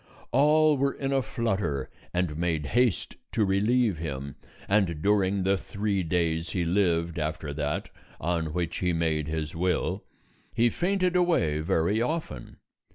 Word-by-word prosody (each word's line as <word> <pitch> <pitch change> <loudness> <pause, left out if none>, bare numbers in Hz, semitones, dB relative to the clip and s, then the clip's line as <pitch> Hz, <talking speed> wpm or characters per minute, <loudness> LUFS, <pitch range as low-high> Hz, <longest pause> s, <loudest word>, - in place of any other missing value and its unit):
All 150 +3 +4
were 140 0 +2
in 135 0 -2
a 135 - +3
flutter 95 - -2 0.2
and 90 -4 -1
made 80 -2 -1
haste 120 +2 +1 0.2
to 110 - +2
relieve 105 0 +2
him, 70 -4 -5 0.3
and 95 -6 +2
during 100 +1 +2
the 95 +1 +2
three 100 0 -2
days 80 -1 0
he 90 -3 -1
lived 85 -2 +1
after 75 -1 -3
that 75 0 -2 0.3
on 80 -1 -1
which 85 0 -2
he 90 -1 0
made 80 -2 0
his 80 -1 -3
will, 90 +2 0 0.5
he 120 0 +3
fainted 185 0 0
away 165 - +2
very 85 +7 +1
often. 150 - -3
90 Hz, 145 wpm, -27 LUFS, 80-115 Hz, 0.5 s, All